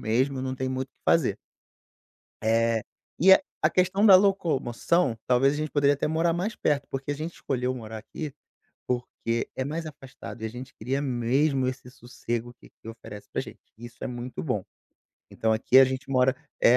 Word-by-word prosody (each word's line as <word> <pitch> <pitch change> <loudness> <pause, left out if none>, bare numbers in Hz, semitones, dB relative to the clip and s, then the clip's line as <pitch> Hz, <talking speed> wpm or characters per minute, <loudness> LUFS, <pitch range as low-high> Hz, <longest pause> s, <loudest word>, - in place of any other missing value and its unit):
mesmo, 130 +4 0
não 130 0 -2
tem 130 0 -3
muito 130 0 -3
o - - -50
que - - -46
fazer. 130 -12 +3 1.1
Eh, 115 0 +2 0.4
e 190 +4 +8
a 190 - +8 0.2
a - - +4
questão 185 +3 +3
da 195 - +9
locomoção, 170 - +2
talvez 135 +3 +3
a - - -3
gente 155 0 -3
poderia 145 -1 +4
até 145 - -2
morar 165 +2 +1
mais 185 +6 -2
perto, 145 -1 0
porque 135 +1 -4
a - - 0
gente 155 +4 -5
escolheu 130 -1 -2
morar 110 -2 -7
aqui, 150 +6 -7 0.5
porque 120 -1 -2
é 130 - -1
mais 160 +4 -4
afastado 135 -5 -10
e - - -3
a 110 - -1
gente 125 +3 -9
queria 130 +5 -2
mesmo 130 +1 +1
esse 130 -1 -5
sossego 120 -1 -5
que - - -16
aqui - - -15
oferece 110 -2 -10
pra - - -1
gente, - - -9 0.2
isso 120 0 -11
é - - -1
muito 125 0 -6
bom. 125 - -1 0.7
Então, 110 0 0
aqui 110 +3 +2
a 135 - +10
gente 130 +1 -4
mora 130 -1 +3 0.2
eh, 120 - +6
130 Hz, 195 wpm, -26 LUFS, 120-150 Hz, 1.1 s, a